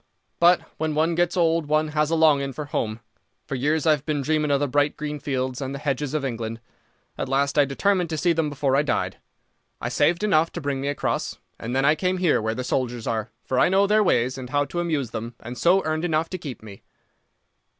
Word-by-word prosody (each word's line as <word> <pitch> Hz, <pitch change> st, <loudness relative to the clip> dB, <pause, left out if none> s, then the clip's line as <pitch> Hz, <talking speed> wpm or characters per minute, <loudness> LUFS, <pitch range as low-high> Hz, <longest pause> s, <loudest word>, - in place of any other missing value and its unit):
"But 175 Hz, +1 st, +5 dB, 0.2 s
when 155 Hz, -1 st, -1 dB
one 160 Hz, +2 st, +2 dB
gets 175 Hz, +2 st, +1 dB
old 165 Hz, -2 st, +2 dB
one 155 Hz, +1 st, +1 dB
has 150 Hz, 0 st, +1 dB
a 165 Hz, -, +1 dB
longing 145 Hz, -4 st, +3 dB
for 150 Hz, +4 st, -5 dB
home. 110 Hz, -5 st, -3 dB, 0.4 s
For -, -, -6 dB
years 145 Hz, +4 st, 0 dB
I've 150 Hz, -3 st, +3 dB
been 150 Hz, -2 st, -1 dB
dreaming 155 Hz, 0 st, +1 dB
of 140 Hz, -1 st, +3 dB
the 145 Hz, -, 0 dB
bright 145 Hz, +2 st, +1 dB
green 150 Hz, -1 st, -4 dB
fields 130 Hz, -2 st, -2 dB
and 135 Hz, 0 st, -4 dB
the 140 Hz, -, -9 dB
hedges 140 Hz, +1 st, -1 dB
of 145 Hz, -2 st, -1 dB
England. 115 Hz, -2 st, -4 dB, 0.6 s
At 135 Hz, -, -2 dB
last 140 Hz, +1 st, +1 dB
I 145 Hz, -2 st, +5 dB
determined 180 Hz, +5 st, +1 dB
to 160 Hz, -, -2 dB
see 170 Hz, +3 st, +2 dB
them 160 Hz, -2 st, 0 dB
before 140 Hz, -2 st, 0 dB
I 140 Hz, -, +4 dB
died. 150 Hz, -, -1 dB, 0.6 s
I -, -, -3 dB
saved 170 Hz, +6 st, +2 dB
enough 165 Hz, -6 st, +3 dB
to 170 Hz, -, -5 dB
bring 140 Hz, -2 st, -2 dB
me 140 Hz, -, -2 dB
across, 145 Hz, 0 st, -2 dB, 0.2 s
and 120 Hz, +3 st, -4 dB
then 135 Hz, +1 st, +2 dB
I 150 Hz, -, +6 dB
came 180 Hz, +3 st, -1 dB
here 180 Hz, -9 st, +2 dB
where 110 Hz, +1 st, -1 dB
the 125 Hz, -, -3 dB
soldiers 125 Hz, -2 st, -2 dB
are, 110 Hz, 0 st, -2 dB, 0.2 s
for 130 Hz, -, 0 dB
I -, -, +5 dB
know 195 Hz, +2 st, +4 dB
their 210 Hz, +2 st, +3 dB
ways 130 Hz, -, +1 dB
and 125 Hz, -1 st, -7 dB
how 145 Hz, +1 st, +1 dB
to 175 Hz, -, -4 dB
amuse 155 Hz, -8 st, -1 dB
them 115 Hz, +1 st, -5 dB
and 120 Hz, +2 st, -8 dB
so 175 Hz, +10 st, +3 dB
earn 155 Hz, +1 st, -1 dB
enough 165 Hz, -1 st, 0 dB
to 185 Hz, -, -5 dB
keep 135 Hz, -9 st, -8 dB
me." 100 Hz, -3 st, -11 dB
145 Hz, 235 wpm, -24 LUFS, 130-160 Hz, 0.6 s, I